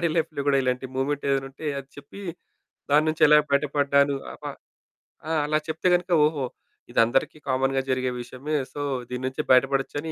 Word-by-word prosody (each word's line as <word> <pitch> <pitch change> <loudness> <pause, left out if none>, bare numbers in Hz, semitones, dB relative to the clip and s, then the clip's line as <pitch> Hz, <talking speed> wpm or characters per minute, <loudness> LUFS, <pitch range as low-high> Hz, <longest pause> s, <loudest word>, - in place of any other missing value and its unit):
Daddy 170 - +2
లైఫ్‌లో 155 -3 -1
గూడా 140 -1 +4
ఇలాంటి 125 +1 -1
మూవ్మెంటేదైనా 135 0 0
ఉంటే 145 +3 -9
అది 135 0 -9
చెప్పి 145 +8 -11 0.7
దాని 150 +2 +5
నుంచి 155 - -4
ఎలా 150 0 +7
బయటపడ్డాను 140 0 +2 0.2
ఆప - - -16 0.9
ఆ! - - -1
అలా 155 +1 +1
చెప్తే 160 +3 -1
గనుక 180 0 -3
ఓహో! 150 -4 0 0.5
ఇదందరికీ 120 +6 +2
కామన్‌గా 135 +1 +1
జరిగే 130 0 0
విషయమే. 130 +5 -5 0.2
సో 145 - -5 0.3
దీని 125 0 -4
నుంచి 130 +4 -2
బయటపడొచ్చని 135 +4 +2
140 Hz, 155 wpm, -25 LUFS, 135-150 Hz, 0.9 s, ఎలా